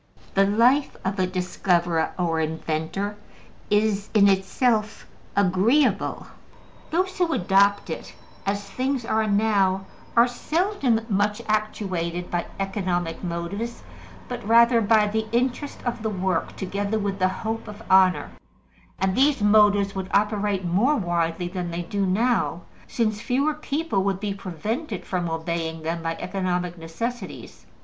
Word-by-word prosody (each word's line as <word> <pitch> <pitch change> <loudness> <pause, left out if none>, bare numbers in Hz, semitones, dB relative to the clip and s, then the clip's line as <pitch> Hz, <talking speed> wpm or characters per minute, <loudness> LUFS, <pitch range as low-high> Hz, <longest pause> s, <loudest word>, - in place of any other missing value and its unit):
The 195 0 +4
life 245 +7 +3
of 195 +1 -1
a 185 - +2
discoverer 180 -2 0
or 165 -3 0
inventor 160 +5 -2 0.5
is 210 -1 +1
in 200 -1 +7
itself 210 +3 +1 0.3
agreeable: 200 +9 +2 0.6
those 370 +3 -1
who 350 -2 +2
adopt 200 +2 +3
it, - - -7 0.3
as 200 0 -1
things 260 +1 -2
are 220 -1 +1
now, 200 -2 +2 0.3
are 235 +1 +7
seldom 280 - 0
much 205 0 +1
actuated 185 -5 -2
by 175 -1 -1
economic 185 -4 -2
motives, 180 +7 -4 0.4
but 245 -1 -5
rather 235 +2 +5
by 215 0 +4
the 220 +1 -1
interest 255 +4 -1
of 240 -1 -2
the 220 - -1
work 190 -3 -1
together 200 +3 -2
with 200 -2 -2
the 185 - +4
hope 225 +3 -4
of 210 +1 -9
honor; 190 -1 +4 0.7
and 190 0 0
these 275 -3 +3
motives 205 -1 +4
would 190 -1 -4
operate 205 -2 +1
more 205 - +3
widely 175 - -1
than 175 -1 -4
they 170 +1 -3
do 195 +3 -1
now, 225 -2 +1 0.3
since 215 -3 -1
fewer 275 +6 +1
people 300 -7 -1
would 195 -1 0
be 205 -1 -2
prevented 205 - -4
from 175 -2 -2
obeying 165 0 -3
them 165 +1 -2
by 165 0 -2
economic 180 -2 -2
necessities. 205 +9 -6
200 Hz, 135 wpm, -24 LUFS, 180-225 Hz, 0.7 s, in